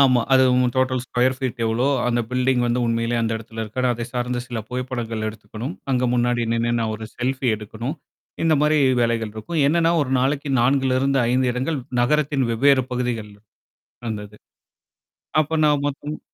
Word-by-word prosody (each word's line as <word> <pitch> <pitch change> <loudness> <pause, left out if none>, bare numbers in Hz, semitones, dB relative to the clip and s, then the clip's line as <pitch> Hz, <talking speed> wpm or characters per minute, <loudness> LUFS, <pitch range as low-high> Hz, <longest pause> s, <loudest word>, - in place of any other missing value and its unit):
ஆமா, 130 -3 +5
அது 130 0 +6
ம் 125 -1 +3
டோட்டல் 130 -1 +1
ஸ்கொயர் 130 +1 +1
ஃ - - -21
பீட் 125 -2 -3
எவளோ? 115 +3 +1 0.2
அந்த 120 0 +1
பில்டிங் 125 0 +1
வந்து 120 +1 +1
உண்மையிலே 115 +1 0
அந்த 115 0 0
இடத்துல 115 0 -7
இருக்கா? 110 +4 -4
அதைச் 120 +1 -5
சார்ந்த 125 0 -1
சில 120 -3 -4
புகைப்படங்கள் 120 -3 -3
எடுத்துக்கணும், 110 - -7 0.2
அங்க 125 0 +2
முன்னாடி 120 0 +1
நின்னு 115 0 0
நான் 110 -1 -1
ஒரு 110 0 -7
செல்ஃபி 130 +1 -1
எடுக்கணும், 115 +8 -6 0.5
இந்த 160 - +4
மாரி 150 0 +3 0.2
வேலைகள் 115 -2 0
இருக்கும். 150 +9 -3
என்னன்னா, 165 +2 +3
ஒரு 130 - -4
நாளைக்கு 140 +2 0
4ல 130 0 +2
இருந்து 135 0 +2
5 125 0 +2
இடங்கள் 135 +4 -2 0.2
நகரத்தின் 145 0 +1
வெவ்வேற 135 +3 +4
பகுதிகள்ல, 115 -4 -3 0.7
அந்தது. 105 -1 -6 1.1
அப்போ 160 +2 -2
நான் 145 -1 +2
மொத்தம் 145 +2 -6
125 Hz, 165 wpm, -22 LUFS, 115-135 Hz, 1.1 s, அது